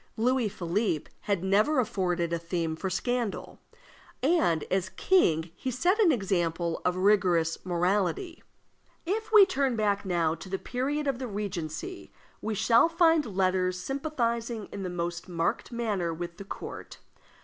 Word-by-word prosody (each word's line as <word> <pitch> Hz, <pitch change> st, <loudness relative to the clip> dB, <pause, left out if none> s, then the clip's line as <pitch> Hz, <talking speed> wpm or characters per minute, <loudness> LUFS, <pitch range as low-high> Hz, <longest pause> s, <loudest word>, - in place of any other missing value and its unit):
Louis 245 Hz, 0 st, +2 dB
Philippe 180 Hz, -3 st, -2 dB
had 200 Hz, -4 st, 0 dB
never 210 Hz, +10 st, +3 dB
afforded 180 Hz, -7 st, 0 dB
a 170 Hz, -, 0 dB
theme 165 Hz, -1 st, -2 dB
for 190 Hz, +4 st, -3 dB
scandal, 240 Hz, +3 st, -2 dB, 0.6 s
and 265 Hz, -, +3 dB
as 185 Hz, 0 st, 0 dB
king 170 Hz, -, +2 dB
he 260 Hz, -, -4 dB
set 350 Hz, -, +1 dB
an 390 Hz, -7 st, +6 dB
example 175 Hz, -, -1 dB
of 180 Hz, -, +1 dB
rigorous 180 Hz, -4 st, +2 dB
morality. 195 Hz, -, 0 dB, 0.6 s
If 435 Hz, +5 st, -2 dB
we 425 Hz, -3 st, +9 dB
turn 275 Hz, -8 st, 0 dB
back 205 Hz, -2 st, +1 dB
now 170 Hz, -4 st, +1 dB
to 165 Hz, +3 st, -9 dB
the 195 Hz, -, -1 dB
period 275 Hz, +7 st, -2 dB
of 270 Hz, -3 st, -1 dB
the 255 Hz, -, -4 dB
Regency, 200 Hz, -, -5 dB, 0.3 s
we 215 Hz, 0 st, -2 dB
shall 235 Hz, -, +4 dB
find 325 Hz, -, +2 dB
letters 185 Hz, -1 st, +1 dB
sympathizing 235 Hz, -, -2 dB
in 200 Hz, -, -6 dB
the 185 Hz, -, -3 dB
most 175 Hz, +1 st, -4 dB
marked 170 Hz, +6 st, -1 dB
manner 210 Hz, -8 st, -1 dB
with 170 Hz, +1 st, -6 dB
the 200 Hz, -, -9 dB
court. -, -, -8 dB
200 Hz, 150 wpm, -28 LUFS, 175-255 Hz, 0.6 s, we